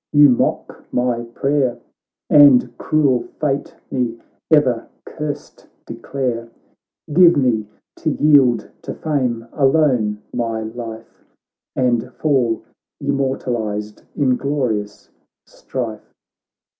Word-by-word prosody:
— - - -70
you 145 -1 +7
mock 125 - -1
my 125 -1 0
prayer 135 -3 +1 0.5
And 130 -5 +6
cruel 140 -5 +2 0.2
fate 140 -2 -1 0.2
me 120 -3 -1 0.3
ever 130 -7 +3 0.2
cursed 150 -2 -7 0.2
declare, 120 -4 -4 0.6
Give 175 0 +6
me, 115 -6 +1 0.3
to 160 - -1
yield 135 -7 +4
to - - -6
fame 125 -7 -2
alone 135 -8 +2
my 115 -2 -2
life, 115 0 -8 0.5
And 125 -1 0
fall 125 -7 +1 0.4
immortalized 115 -6 -2
in 130 -3 +2
glorious 120 -8 -3 0.3
strife 115 -5 -6
125 Hz, 95 wpm, -19 LUFS, 115-145 Hz, 0.6 s, you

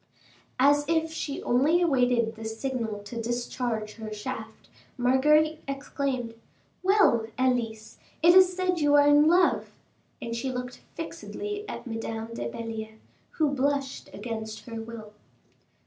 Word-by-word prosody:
As 290 +2 +5
if 320 0 +1
she 295 -3 -4
only 285 +8 +3
awaited 245 -7 +2
this 220 0 -7
signal 230 -6 -3
to 230 +3 -5
discharge 240 -2 -3
her 220 -1 -7
shaft, 220 +1 -7 0.3
Marguerite 300 +5 +3
exclaimed, 275 -3 -3 0.5
"Well, 370 - +4
Elise, 235 -4 -1 0.2
it 345 +1 +8
is 370 0 +7
said 365 -1 0
you 290 -1 +4
are 290 0 +6
in 290 +1 +6
love." 355 +2 +3 0.4
And 230 0 -4
she 260 +3 -2
looked 250 0 -6
fixedly 415 0 -6
at - - -6
Madame 225 -1 -5
de 120 - -4
Belliere, 220 - -6 0.4
who 305 -3 +1
blushed 275 0 -1
against 220 0 -6
her 230 -2 -6
will. 225 -2 -9
250 Hz, 130 wpm, -27 LUFS, 225-290 Hz, 0.5 s, it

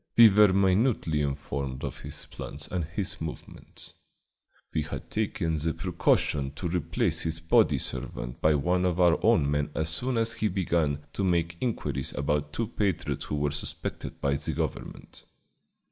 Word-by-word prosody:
We 115 -2 +10
were 105 0 +6
minutely 95 - +2
informed 70 -2 -3
of - - -4
his - - -7
plans 75 +2 -6
and 90 -4 -2
his 90 +3 -4
movements. 80 -1 -8 0.8
We 80 - +1
had 75 - -6
taken 90 -7 -1
the 80 +1 -1
precaution 70 -2 +1
to 90 +5 -4
replace 85 +1 0
his 80 0 -2
body 85 - +4
servant 65 +1 -5
by 80 -1 +4
one 90 +6 +1
of 90 -1 +1
our 85 -2 +4
own 70 0 +4
men 75 0 0
as 80 +1 0
soon 125 +8 0
as 115 0 +1
he 110 - 0
began 85 -6 0
to 100 - -2
make 85 -2 +1
inquiries 85 - -2
about 75 +1 0
two 115 +9 -1
patriots 100 -7 -1
who - - -3
were 75 -1 0
suspected 75 - -5
by 70 - +1
the 70 - -2
government. - - -5
80 Hz, 160 wpm, -28 LUFS, 75-95 Hz, 0.8 s, We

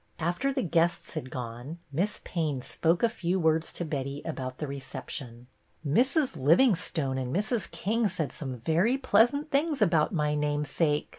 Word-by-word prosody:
After 175 +12 0
the 265 -1 -1
guests 170 0 +1
had 130 - -5
gone. 125 +5 -6
Miss 185 +9 -1
Payne 150 -7 -2
spoke 165 - +1
a - - +7
few 190 -5 -1
words 160 -1 +2
to 175 - -3
Betty 140 -1 -4
about 130 -5 -4
the 150 - -3
reception. 135 -3 -6 0.2
" 155 - -11
Mrs. 260 - +2
Livingstone 160 - +2
and 125 -1 -3
Mrs. 210 - 0
King 220 +4 0
said 160 -7 -3
some 130 -4 -5
very 170 - +2
pleasant 260 +4 +3
things 295 +1 +1
about 165 -7 +3
my 150 -5 +1
name 150 0 0
sake. 150 +1 0
160 Hz, 165 wpm, -28 LUFS, 140-210 Hz, 0.2 s, a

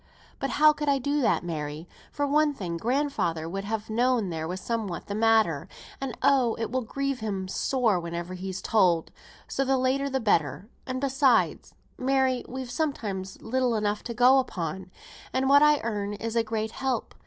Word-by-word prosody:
But 275 - -2
how 305 +1 +7
could 295 0 -2
I 280 - +3
do 285 +2 0
that, 235 - +2
Mary? 155 -1 -5 0.2
For 290 - -1
one 295 +1 +2
thing, 175 -8 -4
grandfather 230 - -1
would 195 +3 -4
have 220 0 -3
known 235 -3 +1
there 160 -1 -3
was 180 +2 -4
somewhat 215 -4 -3
the 200 - -5
matter; 220 -8 +2 0.3
and, 270 -3 -4
oh! 265 -4 +4
it 225 0 -3
will 260 0 0
grieve 275 +3 -3
him 195 -4 -3
sore 225 0 +1
whenever 170 +1 -5
he's 185 0 -5
told, 180 -7 +2 0.4
so 275 - -1
the 270 0 +2
later 265 +2 +1
the 265 0 0
better; 195 - +1 0.2
and 255 0 -2
besides, 270 -3 +2 0.2
Mary, 260 -1 +1
we've 260 -1 -6
sometimes 205 - -3
little 250 0 +1
enough 210 -1 0
to 235 - -5
go 250 +3 +6
upon, 185 -6 -4 0.4
and 260 +1 +1
what 285 +1 +7
I 300 -1 +5
earn 205 -3 -2
is 225 +2 -4
a 230 - +4
great 220 0 -3
help. 260 -3 -2
230 Hz, 180 wpm, -27 LUFS, 190-265 Hz, 0.4 s, how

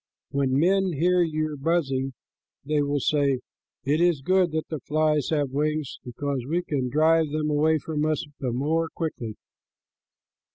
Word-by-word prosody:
When 135 -1 +1
men 190 +2 +3
hear 180 +4 +3
your 155 -2 -1
buzzing, 135 -3 0 0.5
they 150 0 +1
will 145 0 0
say, 140 -2 +1 0.4
'It 150 +4 +1
is 170 -6 +2
good 185 +1 +3
that 160 0 -2
the 155 - -3
flies 150 +1 +1
have 145 -4 0
wings, 150 +1 -1
because 135 +1 -3
we 175 +3 0
can 135 -6 -2
drive 160 +3 +3
them 150 0 -1
away 155 +2 +3
from 150 0 -3
us 155 -1 0
the 130 -4 -2
more 160 +6 0
quickly.'" 120 -10 -4
150 Hz, 155 wpm, -25 LUFS, 140-160 Hz, 0.5 s, men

